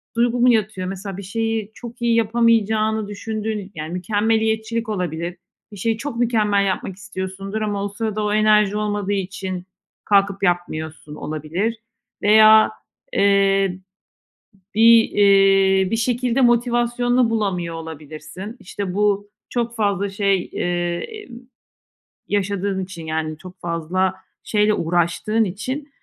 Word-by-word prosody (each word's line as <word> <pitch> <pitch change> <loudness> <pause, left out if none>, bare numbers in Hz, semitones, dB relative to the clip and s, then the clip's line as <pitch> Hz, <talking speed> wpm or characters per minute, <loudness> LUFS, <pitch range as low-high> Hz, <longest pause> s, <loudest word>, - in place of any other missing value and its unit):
duygu 240 +1 +1
mu 250 +1 +5
yatıyor 215 -5 +1
mesela? 195 0 -6
Bir 200 - -7
şeyi 225 +1 -2
çok 240 +1 -10
iyi 235 -1 +2
yapamayacağını 220 -1 +2
düşündüğün 210 -1 -4
yani, 155 +2 -5
mükemmeliyetçilik 220 +4 0
olabilir. 175 -2 -3 0.3
Bir 205 - -10
şeyi 225 +3 0
çok 255 0 -5
mükemmel 215 -4 +2
yapmak 190 0 -2
istiyorsundur 195 +1 -5
ama 205 -2 -2
o 205 - -3
sırada 215 0 -3
o 210 0 0
enerji 210 -1 +3
olmadığı 205 -1 -1
için 185 -1 -4 0.4
kalkıp 200 -1 +2
yapmıyorsun 160 -4 -2
olabilir 165 +11 -3 0.4
veya, 215 +1 +7 0.4
eee, 195 -2 +3 1.0
bir, 230 +1 +6
eee, 195 -1 +4
bir 225 - +1
şekilde 245 +2 0
motivasyonunu 240 0 +2
bulamıyor 185 -7 -1
olabilirsin. 160 - -8
İşte 185 0 -5
bu 205 0 +1 0.2
çok 235 -1 -2
fazla 200 -2 0
şey, 195 -2 0
eee, 175 -1 -1
emm, 415 - -9 0.9
yaşadığın 200 -1 -1
için, 170 -3 -9
yani, 155 -1 -3
çok 185 +2 -13
fazla 175 +3 -1 0.3
şeyle 210 0 +2
uğraştığın 175 +7 +1
için 255 +10 -4
205 Hz, 120 wpm, -21 LUFS, 185-225 Hz, 1.0 s, veya